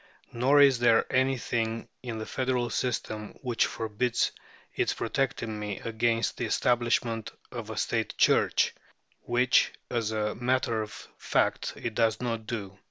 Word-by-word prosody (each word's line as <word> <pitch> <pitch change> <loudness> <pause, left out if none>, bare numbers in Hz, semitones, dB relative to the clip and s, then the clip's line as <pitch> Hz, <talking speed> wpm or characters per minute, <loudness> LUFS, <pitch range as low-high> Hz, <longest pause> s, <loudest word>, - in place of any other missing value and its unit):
Nor 135 +5 +4
is 135 -3 +6
there 115 -2 +4
anything 120 -3 0
in 120 -3 -5
the 110 - -4
federal 125 -2 -1
system 110 -4 -3
which 120 -3 +1
forbids 115 +2 -1 0.4
its - - 0
protecting 115 -5 -2
me 105 -2 -4
against 115 0 0
the 120 - -1
establishment 120 -1 +1 0.2
of - - -6
a - - -6
State - - -1
Church, - - +3 0.5
which, 125 +1 +3 0.2
as 115 -3 0
a 105 -1 -1
matter 120 -2 0
of 105 - -8
fact, - - 0
it 115 - -4
does 110 0 +2
not 115 -3 -3
do. 100 -4 -5
115 Hz, 140 wpm, -28 LUFS, 110-125 Hz, 0.5 s, is